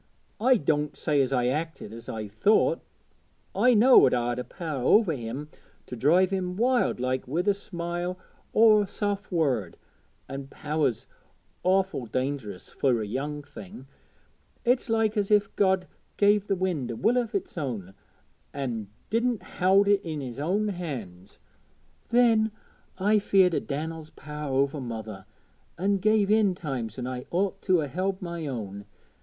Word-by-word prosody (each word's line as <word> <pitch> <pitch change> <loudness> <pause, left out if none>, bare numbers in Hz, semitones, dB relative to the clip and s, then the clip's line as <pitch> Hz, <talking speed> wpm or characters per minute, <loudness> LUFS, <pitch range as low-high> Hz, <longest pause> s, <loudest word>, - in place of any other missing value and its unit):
I 255 +3 +4
doänt 150 -2 0
say 150 -3 +2
as 135 -1 0
I 125 -2 +1
acted 150 -3 -3
as 115 0 -9
I 110 -1 -4 0.2
ought; 215 - +4 0.7
I 250 -1 +4
knowed 245 - +7
I'd 120 0 -1
a - - -2
power 155 -6 -5
over 205 - +4
him 130 +3 -5 0.4
to - - -7
drive 175 +10 +3
him 180 -2 -2
wild 245 - +2
like 130 +1 -1
wi' 155 +7 0
a 205 - +4
smile 175 -2 -4 0.3
or 215 -1 +6
a 205 - -2
soft 205 0 -3
word, 130 - 0 0.5
an' 135 0 -6
power's 150 -4 -2 0.6
awful 185 -8 +1
dangerous 130 -5 -3
fur 125 -4 +1
a 110 - -2
young 145 +7 -4
thing 110 0 -11 0.8
it's 245 0 +2
like 225 -1 +1
as 200 -1 0
if 205 -1 +2
God 190 -2 +2 0.3
gave 205 0 +3
the 195 - +1
wind 175 -9 -2
a 120 - -3
will 235 - +2
o' 235 -2 -2
its 195 -2 -3
own, 115 - -4 0.6
an' 120 -7 -3 0.2
didn't 235 0 0
howd 195 +2 +3
it 200 -1 +4
in 160 -5 -5
His 130 -2 -6
own 200 +8 0
hand. 115 - -7 0.7
Then 230 -2 +4 0.5
I 205 +3 +3
was - - -19
feared 190 -3 +4
o' - - +2
Dan'el's 155 +2 -5
power 150 -1 -7
over 140 +2 +1
mother, 110 -5 -7 0.5
an' 200 +3 +1
give 210 +1 +2
in 210 -4 +3
times 130 - -5
when 125 - -4
I 125 0 -5
ought 195 +2 -1
to 185 -4 +2
'a 145 - -2
held 185 +6 -2
my 170 -3 -5
own. 100 -6 -5
160 Hz, 160 wpm, -27 LUFS, 130-200 Hz, 0.8 s, knowed